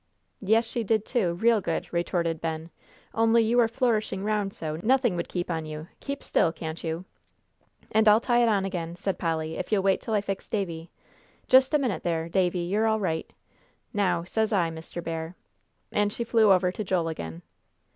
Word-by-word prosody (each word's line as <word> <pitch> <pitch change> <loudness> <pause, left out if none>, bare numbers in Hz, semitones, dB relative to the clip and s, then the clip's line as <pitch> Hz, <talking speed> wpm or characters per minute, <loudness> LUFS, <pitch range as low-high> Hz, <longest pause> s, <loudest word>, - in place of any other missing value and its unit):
"Yes, 220 +3 +3
she 230 +1 -3
did, 220 0 +1
too, 200 -10 0
real 225 +4 +3
good," 165 -3 -2
retorted 170 -1 -1
Ben, 160 0 -4 0.4
"only 225 +1 +4
you 235 +2 +2
are 235 - +5
flourishing 225 -5 0
round 210 -2 0
so, 155 -4 -5
nothing 245 -2 +3
would 170 - -3
keep 175 -1 -3
on 160 -1 -3
you. 155 +2 -7
Keep 280 0 -5
still, 165 - +2
can't 160 0 -6
you!" 165 +2 -3 0.9
"And 220 0 +3
I'll 210 +1 +7
tie 240 0 +2
it 235 - +4
on 200 -3 +2
again," 170 -3 -4
said 195 +2 -3
Polly, 160 -1 -2
"if - - -5
you'll 200 -3 +2
wait 195 -1 +2
till 225 - -2
I 205 - +2
fix 195 -1 -5
Davie 170 -5 -3 0.6
just 260 +3 +5
a - - +7
minute 240 - -1
there, 165 -1 -1
Davie, 180 -1 +1
you're 210 +5 +1
all 220 0 +2
right. 160 -5 -2 0.6
Now, 195 -4 +1
says 220 +5 -1
I, 175 -5 +2
Mr. 165 +1 -7
Bear," 165 +1 -4 0.6
and 205 0 +1
she 235 - -3
flew 225 -3 +4
over 180 -1 +4
to 215 - -4
Joel 180 -4 0
again. 85 - -6
190 Hz, 195 wpm, -27 LUFS, 165-220 Hz, 0.9 s, I'll